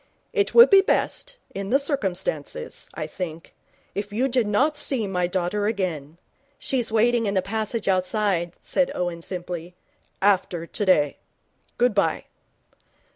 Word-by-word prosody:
It 410 -3 0
would 475 0 +9
be 390 -1 +9
best, - - -1 0.2
in 195 0 -4
the 270 - +5
circumstances, 285 - -2
I - - -3
think, 165 -3 -7 0.4
if 205 +2 -4
you 240 +6 +1
did 245 -4 +1
not 270 +9 +2
see 270 -6 +1
my 180 -2 0
daughter 185 +3 -1
again 170 -8 -3 0.2
' 280 +1 -40
'She's 245 -4 -1
waiting 230 +1 +3
in 200 - -1
the 190 - +3
passage 220 +2 -3
outside,' 185 -2 +1
said 275 - +1
Owen, 175 -1 -2
simply. 175 -1 -6 0.2
' - - -41
after 185 -4 +1
today. 170 -7 +1 0.6
Good 245 -1 +3
bye.' 200 - +1
205 Hz, 145 wpm, -24 LUFS, 180-250 Hz, 0.6 s, would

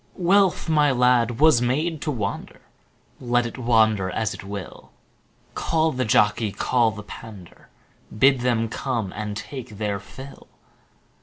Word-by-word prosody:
Wealth, 190 0 +2
my 150 -2 +3
lad, 125 -2 +2
was 155 -5 +5
made 150 +6 -1
to 155 - -3
wander, 105 -8 -4 0.6
Let 120 -1 +1
it 120 - -7
wander 110 -5 +2
as 110 +3 -2
it - - -10
will; 100 -2 -8 0.6
Call 160 0 0
the 130 -2 -2
jockey, 105 0 +2
call 120 +2 +1
the 105 -1 -8
pander, 105 -3 -12 0.5
Bid 135 +3 +4
them 120 -2 0
come 115 -4 -3
and 105 -1 -5
take 125 -4 -8
their 105 -2 -2
fill. 130 +7 -12
120 Hz, 140 wpm, -23 LUFS, 105-135 Hz, 0.6 s, was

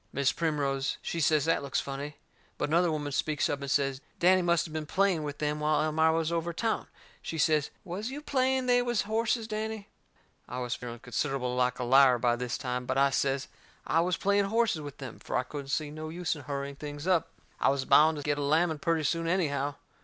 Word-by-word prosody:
Mis' 140 -1 +2
Primrose, 140 -4 -1
she 170 - -3
says 155 0 +3
that 165 - +2
looks 140 -1 -1
funny. 140 +2 -5 0.4
But - - -1
another 170 +2 +3
woman 145 -2 -3
speaks 150 +2 0
up 145 -1 -2
and 140 - -4
says 135 -1 +1 0.2
Danny 185 +1 +5
must 170 -1 +2
of 160 - -9
been 155 -1 -4
playing 190 -1 +2
with 145 -1 -5
them 150 0 -1
while 150 0 +2
Elmira 160 +1 +3
was 165 0 0
over 170 0 -1
town. 225 +6 -1 0.3
She 165 - -5
says, 155 -1 +2
"Was 200 +5 -4
you 275 +3 -5
playing 265 -3 +1
they 245 0 +4
was 240 -2 0
horses, 225 +1 0
Danny?" 220 -1 -4 0.6
I 125 - -5
was 125 -1 -2
feeling 120 -1 -6
considerable 125 +1 -2
like 125 -1 +1
a 125 - -3
liar 130 0 +6
by 120 0 +2
this 125 0 -3
time, 125 -2 -3
but - - -1
I 140 0 +4
says 135 0 0 0.4
I 165 - +2
was 175 0 0
playing 200 0 +2
horses 220 -5 +1
with 145 -2 -8
them, 130 -5 -8
fur - - -5
I 125 - +2
couldn't 140 +1 -7
see 145 +1 -2
no 155 +1 -6
use 175 +1 -2
in 145 - -9
hurrying 140 0 -4
things 145 +1 -7
up. 180 -4 +2 0.3
I - - +3
was 135 -1 0
bound 155 +1 +5
to 145 - -5
get 145 0 0
a - - -1
lamming 155 +2 +2
purty 165 0 0
soon 165 +3 0
anyhow. 145 -5 0
150 Hz, 220 wpm, -29 LUFS, 140-175 Hz, 0.6 s, liar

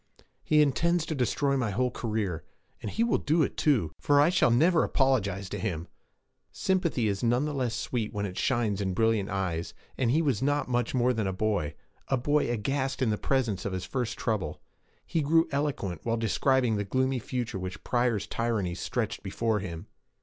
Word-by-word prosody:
'He 150 0 +5
intends 170 +4 +1
to - - -3
destroy 140 +1 +1
my 120 -4 0
whole 125 +5 0
career. 105 -9 -2 0.4
And - - -4
he 230 - 0
will 235 - +2
do 155 +2 +2
it, - - -2
too, 120 - +2
for 145 -1 +3
I 145 +3 +6
shall 180 -8 +3
never 160 +8 +4
apologize 100 -8 +1
to - - -4
him!' 85 -6 -3 0.6
Sympathy 170 -11 0
is 100 -1 -1
none 120 +4 +2
the 150 - -2
less 125 -4 -1
sweet 115 -2 -2
when 100 -1 -2
it 90 -2 -5
shines 110 -5 0
in 95 -2 -1
brilliant 110 -2 +2
eyes, 90 -4 -2 0.2
and 125 -3 +2
he 155 +7 +3
was 135 -8 +1
not 145 +2 +1
much 120 0 0
more 125 0 +3
than 110 -4 -1
a - - 0
boy 95 -7 -1 0.3
a 135 - +1
boy 145 +2 +1
aghast 130 +3 -1
in 115 - +2
the 105 - 0
presence 125 -8 0
of 100 - -3
his 95 -1 -3
first 125 -4 -3
trouble. 100 -9 -2 0.5
He 165 - 0
grew 165 +3 +3
eloquent 135 - -2
while 115 -1 0
he 115 - -4
described 125 0 +2
the - - 0
gloomy 130 +5 0
future 120 -4 -3
which 95 +1 -6
Pryor's 120 -4 +1
tyranny 110 -6 -1
stretched 110 +4 -3
before 110 +2 -1
him. 85 -4 -6
120 Hz, 195 wpm, -28 LUFS, 100-135 Hz, 0.6 s, I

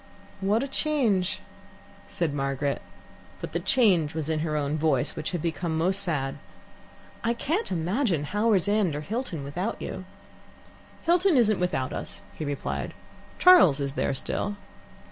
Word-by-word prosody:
" - - -24
"What 225 +4 +3
a - - -2
change!" 250 - 0 0.7
said 165 -4 -1
Margaret. 140 0 -1 0.6
But - - -6
the - - -1
change 185 - +3
was 160 -1 -1
in 155 - 0
her 155 -1 -1
own 145 0 -1
voice, 155 -4 +1
which - - -3
had 175 -4 -3
become 165 -1 -1
most 185 +4 +2
sad. 145 -8 -2 0.8
"I 235 +1 +1
can't 325 - -1
imagine 180 - 0
Howards 205 +3 +2
End 205 -7 +2
or 150 - -3
Hilton 205 - -4
without 175 +10 -3
you." 185 - -6 1.0
"Hilton 350 -1 +4
isn't 215 -5 +3
without 140 -7 -1
us," - - -5
he - - -6
replied. 145 -1 -3 0.4
"Charles 345 - +7
is 140 -1 -2
there 140 - 0
still." 205 +9 -2
175 Hz, 150 wpm, -27 LUFS, 150-225 Hz, 1.0 s, Charles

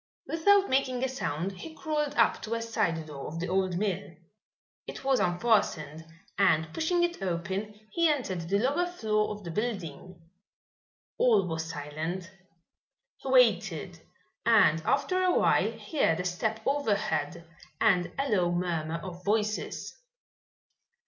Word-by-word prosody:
Without 395 +5 +3
making 260 -1 +1
a - - +2
sound 190 - -3
he 320 -1 -9
crawled 300 -2 -2
up 230 - +3
to 225 +1 -3
a 230 - -2
side 165 -8 -1
door 145 -3 -7
of 165 +2 -6
the 180 - -2
old 185 -1 0
mill. 195 -1 -2 0.7
It - - -7
was 265 -1 +2
unfastened, 175 -6 +1 0.3
and 160 -5 +3
pushing 345 +2 +1
it 345 - -1
open, 190 +4 -3
he 335 -1 +3
entered 190 - -2
the 200 - +3
lower 280 +11 +1
floor 215 -11 0
of 210 -1 -6
the 170 - -6
building. 185 -4 -4 1.0
All 210 -7 +4
was 160 -1 -3
silent. 160 +4 -5 0.9
He - - -7
waited - - +3 0.4
and 210 -9 +5
after 365 +7 +1
awhile 365 -1 +2
heard 180 - 0
a 180 - -3
step 220 +5 -1
overhead 175 - -1 0.3
and 180 -4 +3
a 275 +1 0
low 180 -8 +2
murmur 170 -2 -1
of 180 -1 -8
voices. 215 +1 -1
200 Hz, 135 wpm, -29 LUFS, 170-260 Hz, 1.0 s, and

